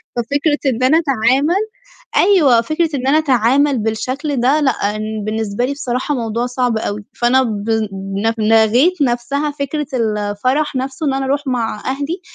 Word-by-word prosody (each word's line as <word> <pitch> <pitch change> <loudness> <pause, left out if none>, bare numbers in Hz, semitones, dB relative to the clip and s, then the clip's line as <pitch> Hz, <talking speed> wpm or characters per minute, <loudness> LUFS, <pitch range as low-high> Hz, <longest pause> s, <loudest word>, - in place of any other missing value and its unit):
ففكرة 285 +5 0
إن 245 +2 -3
أنا 275 +5 +5
أتعامل 280 - +2 0.5
أيوه، 305 - +5
فكرة 310 +6 -1
إن 260 0 -3
أنا 300 +3 +4
أتعامل 270 0 +2
بالشكل 255 +7 -2
ده 270 +5 +3
لأ 265 -4 +2 0.5
بالنسبة 220 +1 -2
لي 280 - -2
بصراحة 260 +1 -2
موضوع 235 -1 -2
صعب 250 -2 -1
أوي، 210 -1 -4
فأنا 250 +2 +2
ب 215 -2 -4
ل 200 -1 -1
لغيت 225 +10 +3
نفْسها 275 +4 0
فكرة 290 +1 -3
الفرح 230 +5 -1
نفْسه 265 +3 -3
إن 275 - +1
أنا 270 0 -1
أرُوح 280 +1 -1
مع 230 -4 -2
أهلي، 285 +7 -3
255 Hz, 150 wpm, -17 LUFS, 225-285 Hz, 0.5 s, أنا